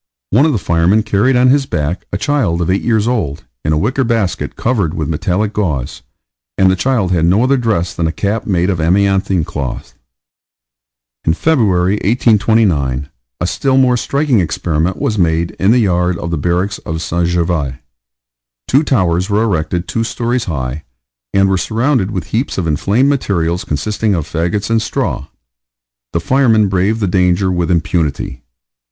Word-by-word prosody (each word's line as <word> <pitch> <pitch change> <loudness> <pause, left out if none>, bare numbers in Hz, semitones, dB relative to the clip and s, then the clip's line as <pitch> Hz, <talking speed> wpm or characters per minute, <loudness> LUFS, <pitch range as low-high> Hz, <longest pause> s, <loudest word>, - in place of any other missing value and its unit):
One 135 +10 +4
of - - +2
the 125 - 0
firemen 90 +4 +2
carried 110 +5 +2
on 125 +1 +4
his 140 -1 +2
back 75 +2 -2
a - - -1
child 95 - 0
eight 95 - +1
years 110 -2 +1
old, 100 - -2 0.2
in 75 - 0
a 75 - +2
wicker 125 - 0
basket 115 -6 -1
covered 100 -9 -1
with 75 - -2
metallic 90 +7 -1
gauze, 75 - -2 0.6
and 95 -1 +4
the - - +2
child 110 -3 0
had 85 -3 +1
no 95 +7 +3
other 135 +2 +3
dress 110 -9 -1
than 85 - -1
a - - -1
cap 105 +5 -2
made 90 -1 +1
of 90 - -2
amianthine 95 0 +1
cloth. 70 -4 -5 1.3
In 80 - +1
February, 105 - +2
1829, 100 - +2 0.3
a 85 - -1
still 130 +9 0
more 130 -2 +4
striking 140 0 +1
experiment 85 0 -1
was 105 -2 -1
made 85 -1 +1
in 95 - +2
the 120 - +5
yard 90 -5 +1
of 85 - -5
the - - 0
barracks 90 +6 -1
of 80 0 -5
St. 85 +1 -1
Gervais. 85 -6 -1 0.9
Two 135 - +3
towers 95 - +1
were 105 +2 +2
erected 90 -3 -1
two 115 - -1
stories 120 +1 -2
high, 70 -2 -4 0.5
and 95 0 +3
were 95 -1 +1
surrounded 115 -1 0
with 95 -5 -3
heaps 120 +6 -1
of 95 - -1
inflamed 100 - +1
materials 90 -11 0
consisting 105 +7 -1
of 80 -4 -3
fagots 90 +6 -2
and 115 -1 +2
straw. 90 -9 -2 0.8
The 85 - 0
firemen 110 0 +3
braved 95 +4 0
the 100 - +1
danger 90 +1 +2
with 90 -1 -1
impunity. 80 -6 -1
95 Hz, 170 wpm, -15 LUFS, 85-115 Hz, 1.3 s, the